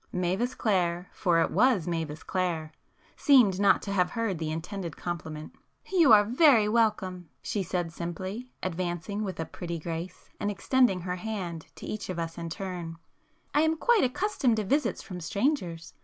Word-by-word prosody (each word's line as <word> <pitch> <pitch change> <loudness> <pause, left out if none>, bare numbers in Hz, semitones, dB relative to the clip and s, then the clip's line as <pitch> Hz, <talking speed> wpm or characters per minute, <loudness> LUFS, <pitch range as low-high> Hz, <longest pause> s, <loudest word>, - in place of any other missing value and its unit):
Mavis 185 +8 -1
Clare,—for 175 -3 +1
it - - +1
was 245 -10 +3
Mavis 160 -3 -3
Clare,—seemed 185 - +1
not 200 -1 +4
to 200 - -4
have 180 -2 +2
heard 225 -7 -2
the 160 -1 -2
intended 170 +1 -5
compliment. 160 -3 -5 0.4
"You 340 -9 +5
are 210 -1 +8
very 240 -1 +5
welcome," 210 -6 0
she 205 - -1
said 175 -2 -2
simply, 185 +8 -5
advancing 185 +3 -3
with 190 -5 -5
a 160 - -1
pretty 170 0 -5
grace, 165 +2 -6
and 205 - -1
extending 220 -2 +2
her 180 +1 -3
hand 180 -6 -5
to - - -9
each 215 -2 -5
of 185 - -3
us 165 0 -4
in 170 0 -4
turn, 175 -2 -5 0.6
"I 295 - +4
am 320 0 +2
quite 475 +3 +3
accustomed 260 - +1
to 215 - -1
visits 285 +9 0
from 180 -3 -7
strangers. 180 - -1
185 Hz, 160 wpm, -28 LUFS, 170-220 Hz, 0.6 s, are